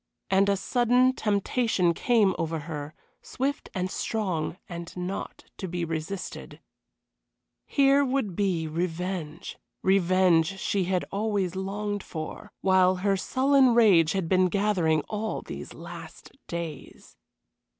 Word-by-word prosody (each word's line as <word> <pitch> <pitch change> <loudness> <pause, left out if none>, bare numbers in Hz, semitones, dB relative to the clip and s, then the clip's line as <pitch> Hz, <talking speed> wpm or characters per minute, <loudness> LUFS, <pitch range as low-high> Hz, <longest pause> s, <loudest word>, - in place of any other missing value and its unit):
And 195 +1 +4
a 200 - +2
sudden 245 +4 +3
temptation 205 -4 +1
came 215 0 +3
over 165 -1 -2
her, 150 -1 -6 0.3
swift 275 +2 -3
and 185 0 -2
strong 185 -7 -2
and 170 0 -8
not 180 +2 -5
to 190 - -4
be 175 -1 -2
resisted. 165 +4 -5 1.1
Here 275 0 +4
would 255 -8 -1
be 180 -5 0
revenge 170 0 -4 0.2
revenge 185 -2 +3
she 195 -1 0
had 180 0 0
always 200 -3 -1
longed 205 +2 -3
for! 155 -3 -7
while 185 -1 +4
her 195 +2 +1
sullen 260 +4 +3
rage 190 -9 +5
had 190 -4 -1
been 185 +1 +4
gathering 180 -5 +1
all 215 +1 -3
these - - -8
last - - -10 0.2
days. 165 -4 -7
190 Hz, 120 wpm, -27 LUFS, 170-210 Hz, 1.1 s, rage